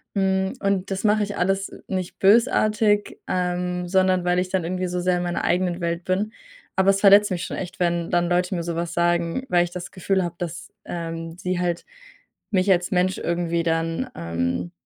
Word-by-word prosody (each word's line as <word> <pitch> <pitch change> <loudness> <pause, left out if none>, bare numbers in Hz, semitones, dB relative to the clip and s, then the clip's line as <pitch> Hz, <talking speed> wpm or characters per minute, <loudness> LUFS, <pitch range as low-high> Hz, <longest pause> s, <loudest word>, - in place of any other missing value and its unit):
Hm, 190 -1 +1
und 195 -1 0
das 190 +2 -2
mache 210 0 +3
ich 205 0 -4
alles 195 +2 0 0.2
nicht 185 -2 -4
bösartig, 210 0 +3
ähm, 180 0 -1
sondern 185 -1 +2
weil 180 0 +2
ich 185 - -1
dann 185 -3 -1
irgendwie 185 +1 -2
so 180 - -2
sehr 180 0 +1
in 175 - -2
meiner 175 0 -2
eigenen 180 0 +1
Welt 170 0 -2
bin. 200 +5 -1 0.4
Aber 190 +1 +3
es 195 0 +3
verletzt 205 0 +6
mich 180 0 -2
schon - - -5
echt, 185 +1 -6
wenn 170 -1 0
dann 175 0 +2
Leute 180 +2 +1
mir 170 - -2
sowas 170 0 -3
sagen, 175 +7 +1
weil 175 -3 +4
ich 175 - -5
das 175 0 -7
Gefühl 190 +1 0
habe, 175 0 -4
dass, 175 +2 -6
ähm, 165 0 -5
sie 185 0 -2
halt 175 -1 -1 0.7
mich 190 0 +2
als 175 -1 +2
Mensch 185 0 +1
irgendwie 170 0 -1
dann, 165 0 -1
ähm, 85 +1 -2
180 Hz, 195 wpm, -23 LUFS, 170-190 Hz, 0.7 s, verletzt